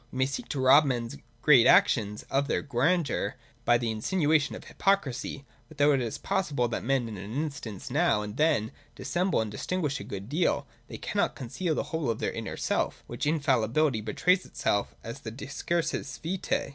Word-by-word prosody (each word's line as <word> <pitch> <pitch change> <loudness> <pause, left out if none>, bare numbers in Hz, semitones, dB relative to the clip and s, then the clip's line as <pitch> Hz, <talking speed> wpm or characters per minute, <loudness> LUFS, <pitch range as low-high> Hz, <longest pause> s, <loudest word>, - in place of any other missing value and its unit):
We - - -7
may 130 - +3
seek 140 - -5
to 145 - -2
rob 135 +4 +7
men's 120 -3 -2 0.3
great 135 -6 +7
actions 105 -1 +4
of 140 +1 +1
their - - 0
grandeur, 150 +5 0 0.3
by 120 0 +5
the 120 -1 -1
insinuation 150 - +1
of - - -9
hypocrisy; 145 -7 -1 0.2
but, 155 - -15
though 145 +1 +5
it 135 -2 +2
is 115 -3 -3
possible 150 -11 0
that - - -3
men 130 -1 +1
in 110 -2 -6
an 100 +3 -7
instance 140 -9 -4
now 145 -7 +2
and 105 0 -6
then 150 -8 +2
may 110 - -9 0.2
dis - - -7
semble 180 -6 +2
and 110 -2 -3
disguise 150 - -2
a - - -6
good 100 0 -7
deal, 160 +7 +1 0.2
they - - -7
cannot - - -1
conceal 155 +7 -2
the - - 0
whole 160 -6 0
of 115 - 0
their - - -1
inner - - -5
self, - - -1
which - - -4
infallibly 140 -3 +2
betrays 180 - +2
itself 105 -4 -1
in 115 - -4
the 110 - -6
decursus 140 +4 -3
vitae. 180 +3 -2
140 Hz, 195 wpm, -28 LUFS, 115-155 Hz, 0.3 s, rob